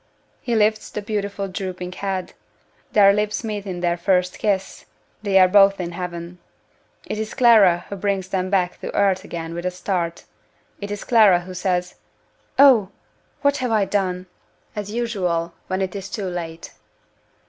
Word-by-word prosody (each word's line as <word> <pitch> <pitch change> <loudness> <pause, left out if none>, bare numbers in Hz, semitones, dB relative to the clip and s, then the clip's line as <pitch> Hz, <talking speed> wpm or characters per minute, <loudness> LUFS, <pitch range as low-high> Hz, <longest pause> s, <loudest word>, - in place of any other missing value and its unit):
He 240 -2 -1
lifts 215 0 +2
the - - -5
beautiful 200 -1 -3
drooping 185 -1 -5
head 190 -1 -4 0.6
their 200 -1 +6
lips 210 +3 -1
meet 210 -2 -4
in 180 -2 -5
their 175 -1 +1
first 180 0 +1
kiss 195 -3 -1 0.4
they 200 -2 +2
are 185 -1 +7
both 195 +1 +5
in 175 -1 -3
heaven: 175 0 -6 0.7
it 215 - -4
is 220 0 -4
Clara 210 -9 +5
who 200 - -6
brings 195 -1 -2
them 185 -1 -1
back 185 -2 0
to - - -5
earth 195 -2 +2
again 165 -1 -6
with 170 0 -5
a 180 - 0
start 180 -2 -3 0.6
it 200 - -6
is 205 0 -5
Clara 210 -7 +5
who 185 +1 -9
says, 180 -1 -1 0.6
"Oh! 255 -8 +6 0.5
what 285 0 +3
have 255 -1 -2
I 215 -3 +2
done?" 185 -2 -1 0.5
as 205 -1 -4
usual, 185 -8 -1
when 190 +1 -1
it 190 +1 -4
is 195 0 -6
too 195 +1 -4
late. 170 -2 -6
190 Hz, 165 wpm, -22 LUFS, 180-205 Hz, 0.7 s, are